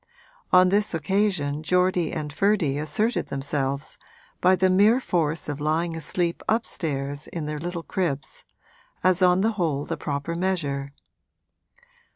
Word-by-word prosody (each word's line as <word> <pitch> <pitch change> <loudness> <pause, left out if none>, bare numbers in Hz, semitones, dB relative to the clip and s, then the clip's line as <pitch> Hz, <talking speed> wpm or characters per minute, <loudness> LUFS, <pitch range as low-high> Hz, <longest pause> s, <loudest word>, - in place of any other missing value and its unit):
On 185 0 +6
this 205 -1 +1
occasion 160 -3 0
Geordie 180 +1 +2
and 150 -2 -4
Ferdy 170 -6 +1
asserted 210 - 0
themselves, 140 0 -2 0.4
by 185 +1 +5
the 185 +1 +3
mere 205 +6 +5
force 165 - -1
of 145 -1 -4
lying 165 +2 0
asleep 170 +2 -2
upstairs 145 -10 -2
in 165 -3 -5
their 150 0 -4
little 170 +1 -4
cribs, 165 -8 -3 0.6
as 185 0 +3
on 180 0 +5
the 220 +3 +2
whole 145 -4 0
the - - -4
proper 145 +3 -3
measure. 155 -6 -2
165 Hz, 135 wpm, -25 LUFS, 145-185 Hz, 0.6 s, On